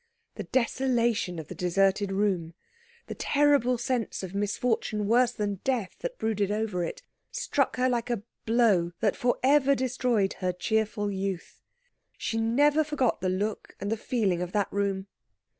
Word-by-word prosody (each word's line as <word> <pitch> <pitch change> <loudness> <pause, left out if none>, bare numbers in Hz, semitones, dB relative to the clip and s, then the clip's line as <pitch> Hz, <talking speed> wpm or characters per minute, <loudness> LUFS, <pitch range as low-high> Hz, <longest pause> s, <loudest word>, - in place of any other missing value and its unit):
The - - -6
desolation 235 -7 +1
of 160 -3 -6
the - - -7
deserted 195 +2 +1
room, 190 -5 0 0.5
the - - -6
terrible 285 -4 +2
sense 240 -4 -2
of 185 0 -6
misfortune 210 +1 -1
worse 240 +3 +4
than 205 -4 -3
death 245 -8 -1
that - - -5
brooded 210 -3 0
over 210 -4 -1
it, 170 - -5 0.3
struck 290 - 0
her 255 0 +2
like 245 -1 -1
a 235 -4 -2 0.2
blow 210 -7 +3
that 210 -3 +2
for 245 0 +1
ever 280 0 +5
destroyed 245 -5 0
her 185 -1 0
cheerful 210 +1 -1
youth. 190 -2 -4 0.6
She 225 - -2
never 285 +7 +3
forgot 285 - 0
the 185 - 0
look 205 +4 -3
and 200 +2 -3
the - - +2
feeling 210 -6 0
of 180 0 -4
that 205 -2 0
room. 195 -1 -1
220 Hz, 160 wpm, -28 LUFS, 195-250 Hz, 0.6 s, ever